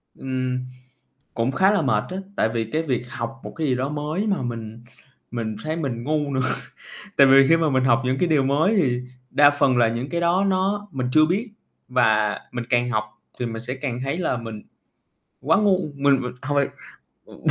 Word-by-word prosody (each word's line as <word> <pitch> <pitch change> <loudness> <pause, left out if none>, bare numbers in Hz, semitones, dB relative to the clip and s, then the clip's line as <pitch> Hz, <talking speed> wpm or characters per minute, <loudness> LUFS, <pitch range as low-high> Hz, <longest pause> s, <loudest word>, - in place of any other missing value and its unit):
Ừm, 130 -1 -2 0.7
cũng 115 +3 0
khá 190 +8 +3
là 205 - +2
mệt 110 -6 +1
á, 185 - -5 0.2
tại 110 - +2
vì 115 -1 -1
cái 160 +1 0
việc 125 -5 -1
học 130 0 -5
một - - -7
cái 160 -2 -1
gì 130 - +2
đó 130 +3 -2
mới 150 +7 -2
mà 195 -7 0
mình 115 -2 -6 0.5
mình 110 -3 -3
thấy 155 +1 -2
mình 120 -7 -3
ngu 150 0 -1
nữa. 130 - +1 0.8
Tại 140 - +8
vì 135 0 +7
khi 165 - +6
mà 160 -2 +1
mình 130 -2 +2
học 120 -1 +4
những 130 +1 +1
cái 180 - +1
điều 150 -4 +3
mới 150 +10 +2
thì 125 -2 0 0.3
đa 145 0 +6
phần 135 -3 +2
là 120 -1 +5
những 120 +4 -3
cái 170 0 -2
đó 175 +3 +2
nó 195 +2 0
mình 130 -3 -2
chưa 155 0 +6
biết, 205 +8 -1 0.4
và 110 -4 +2
mình 120 -1 -4
càng 120 0 +2
học 110 -2 +1 0.4
thì 125 - -1
mình 115 -1 -5
sẽ 125 +2 -4
càng 130 -2 -4
thấy 140 +5 -2
là 165 -8 0
mình 115 -2 -7 0.8
quá 160 +6 +3
ngu. 200 -3 +3 0.2
Mình 140 -1 +3
mình 125 0 -4
hổng 145 +2 -2
phải 140 - +2 0.6
ừm, - - -14
135 Hz, 215 wpm, -23 LUFS, 120-155 Hz, 0.8 s, Tại